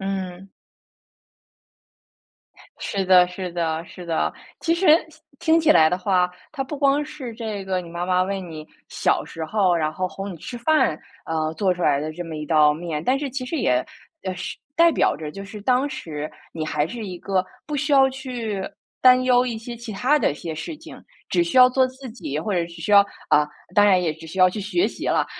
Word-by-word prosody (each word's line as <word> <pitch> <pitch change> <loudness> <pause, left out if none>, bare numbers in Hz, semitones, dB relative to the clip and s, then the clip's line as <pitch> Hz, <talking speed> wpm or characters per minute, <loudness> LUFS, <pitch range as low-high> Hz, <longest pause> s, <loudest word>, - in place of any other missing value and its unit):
嗯。 195 -1 -4 2.3
是 195 -1 -2
的 180 -1 +6
是 180 0 -6
的 165 -1 -2
是 180 - -11
的。 165 -2 0 0.3
其 330 0 +1
实 360 +2 0 0.5
听 320 - +2
听 - - +4
起 315 -1 +3
来 155 -1 +6
的 180 - 0
话， 180 -1 +1 0.2
它 275 -3 -2
不 280 +2 -6
光 280 +1 +3
是 290 -5 -7
这 220 -4 -5
个 185 -1 -1
你 175 - -10
妈 170 +1 -4
妈 185 0 +3
为 195 +1 -2
你 160 -4 -8 0.2
小 - - 0
时 165 - -6
候， 185 +1 +2
然 155 -2 0
后 185 +3 -2
哄 195 +2 -6
你 170 - -9
吃 240 +9 -8
饭， 275 - +2 0.3
呃， 160 -1 -1
做 185 +2 +1
出 180 - -5
来 145 -3 +3
的 155 +1 -4
这 175 - -6
么 165 -2 -7
一 150 - -4
道 150 -2 +5
面。 160 -2 -4
但 260 +8 +2
是 285 - -3
其 255 0 -4
实 325 - -3
也 125 - +1 0.4
呃 185 - -2
是 - - -5 0.2
代 335 0 +6
表 - - +2
着， 150 -1 -6
就 195 +4 -8
是 210 +1 -9
当 255 +4 +2
时 155 - -6 0.2
你 160 -1 -4
还 150 -1 0
是 220 +3 -6
一 180 -2 -6
个 190 0 0 0.2
不 300 - -4
需 295 +1 -1
要 270 -1 +6
去 245 -7 -4 0.4
担 255 0 +6
忧 250 -1 +4
一 235 -3 -3
些 235 +2 -7
其 235 -1 -8
它 265 +9 +2
的 235 - +2
一 - - -4
些 160 +1 -6
事 300 - -6
情， - - -12 0.3
只 345 - +3
需 335 -6 -3
要 250 0 +9
做 260 0 +3
自 260 0 -10
己 185 - -5
或 185 +7 -2
者 180 - +2
是 170 - -2
只 170 -1 -11
需 205 - -1
要 200 - +10 0.3
啊， 150 0 +4 0.3
当 205 - +6
然 185 -2 +4
也 160 -3 0
只 160 +1 -12
需 165 +4 -8
要 185 0 +7
去 210 - -5
学 215 - +1
习 - - -7
了， - - +2
190 Hz, 240 characters per minute, -23 LUFS, 165-255 Hz, 2.3 s, 要